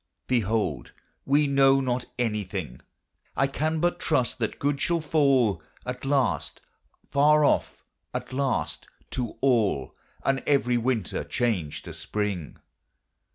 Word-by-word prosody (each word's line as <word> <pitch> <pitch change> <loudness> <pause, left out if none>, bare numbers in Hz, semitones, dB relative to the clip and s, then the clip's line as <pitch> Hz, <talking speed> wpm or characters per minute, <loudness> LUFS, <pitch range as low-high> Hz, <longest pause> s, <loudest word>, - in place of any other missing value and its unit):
Behold, 110 - 0 0.3
we 145 +2 +4
know 135 -1 +5
not 125 -2 -1
anything; 100 - -3 0.6
I 135 - +4
can 155 +3 -1
but 175 +2 +1
trust 130 -7 0
that 110 - -1
good 140 0 -1
shall 170 -1 +2
fall 135 - +2 0.2
At 125 +1 -5
last 135 -3 0 0.5
far 150 +1 +5
off - - +1 0.3
at - - -5
last, 135 -1 -1 0.2
to 120 -3 -3
all, 110 - +2 0.3
And 135 -1 +2
every 125 -4 +3
winter 115 -4 -1
change 95 -12 -1
to - - -8
spring. 100 -7 -3
125 Hz, 120 wpm, -26 LUFS, 105-140 Hz, 0.6 s, know